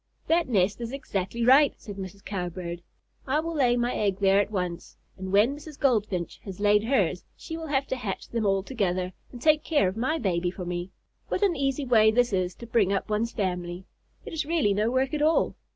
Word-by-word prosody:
"That 335 -1 +2
nest 200 0 +1
is 230 0 -4
exactly 230 -4 -3
right," 275 +3 +6
said 205 -2 -9
Mrs. 195 +1 -8
Cowbird. 175 -3 -4 0.5
"I 280 +3 +2
will 330 +1 -3
lay 250 -5 +3
my 240 +1 0
egg 200 -3 0
there 195 0 +4
at 205 - -3
once, 180 -4 -4 0.2
and 190 0 -6
when 215 +8 +4
Mrs. 300 0 -11
Goldfinch 210 -9 0
has 195 -2 -8
laid 210 +1 +3
hers 195 -8 +1
she 325 - -7
will 325 -1 -6
have 275 -2 +1
to - - 0
hatch 220 -7 -5
them 230 -2 -2
all 195 -2 +2
together 185 -6 -1 0.2
and 245 - -9
take 305 +3 +3
care 290 - +2
of 185 - -3
my 260 +8 0
baby 180 - 0
for 180 0 -7
me. 175 +1 -4 0.4
What - - -1
an 380 -4 +3
easy 275 0 -1
way 220 -3 +5
this 245 0 +2
is 185 -1 0
to 235 - -10
bring 220 -4 +2
up 200 +2 -1
one's 225 +2 0
family! 180 -2 -3 0.4
It - - -7
is 315 -1 -1
really 300 -9 +1
no 210 +3 +1
work 260 +3 0
at 300 - -1
all! 315 +2 +3
215 Hz, 215 wpm, -27 LUFS, 190-270 Hz, 0.5 s, right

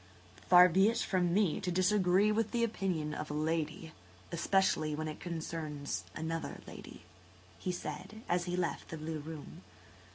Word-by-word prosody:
"Far 180 0 +9
be 190 +4 +4
it 230 - -1
from 180 -5 +1
me 190 -3 +2
to 180 - -2
disagree 185 +2 +3
with 220 0 +1
the 235 +1 0
opinion 180 -9 -1
of 150 0 -5
a 150 - -3
lady–especially 155 - -1
when 155 +1 -3
it 155 - -6
concerns 155 - -4
another 165 0 -3
lady," - - -11 0.6
he 185 - -2
said, 180 +6 -6
as 175 0 +1
he 180 0 -2
left 175 -2 -2
the 160 - -5
blue 155 0 -4
room. 160 +2 -9
170 Hz, 155 wpm, -33 LUFS, 155-185 Hz, 0.6 s, Far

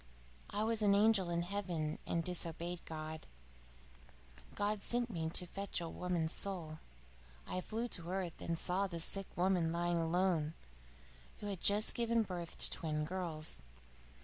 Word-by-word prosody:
I 205 +1 0
was 225 0 +1
an 200 -1 +5
angel 205 -3 +4
in 170 0 +1
heaven 175 -5 -2
and 165 - +1
disobeyed 170 0 -2
God. 155 0 -6 1.3
God 205 0 0
sent 240 +1 +1
me 160 -4 -1
to 180 - +3
fetch 195 +2 -3
a 170 - -3
woman's 170 -2 0
soul. 165 -6 0 0.7
I 185 - -2
flew 225 +5 -2
to 170 -4 -3
earth, 185 -2 -2
and 165 -1 -1
saw 185 +4 +3
a 170 - -3
sick 195 +4 +1
woman 180 -2 +3
lying 175 0 +1
alone, 165 -2 +2 0.8
who - - -6
had 200 -4 -3
just 205 +2 +4
given 230 -1 +2
birth 175 -4 -5
to - - +1
twin 150 -1 0
girls. 165 -3 -3
180 Hz, 150 wpm, -37 LUFS, 165-200 Hz, 1.3 s, an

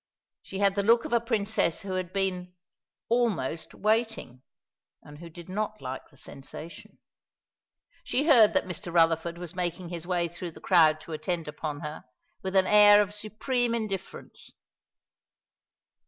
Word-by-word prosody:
She 195 - -8
had 200 0 +3
the 200 - 0
look 230 +3 +4
of - - -4
a 235 - +5
Princess 215 -6 0
who 195 - -6
had 185 -1 -3
been 185 -2 -2 0.5
"almost 215 - -1
waiting," 220 - -1 0.6
and 145 0 -13
who 170 0 -9
did 170 +1 -12
not 215 +3 -3
like 130 0 -7
the 140 - -21
sensation. 145 +5 -10 1.1
She 280 - 0
heard 240 -10 +6
that - - +2
Mr. 175 -1 -5
Rutherford 165 0 +2
was 175 -1 -7
making 175 -1 -3
his 170 -1 -7
way 175 -2 +1
through 175 0 -7
the - - -13
crowd 160 -4 +4
to 160 - -9
attend 160 +1 -3
upon 150 -1 -5
her, 150 +1 -6 0.4
with 190 0 -4
an 190 -1 +5
air 205 0 +8
of 205 0 +1
supreme 230 +3 -1
indifference. 195 -5 -5
185 Hz, 155 wpm, -28 LUFS, 165-210 Hz, 1.1 s, air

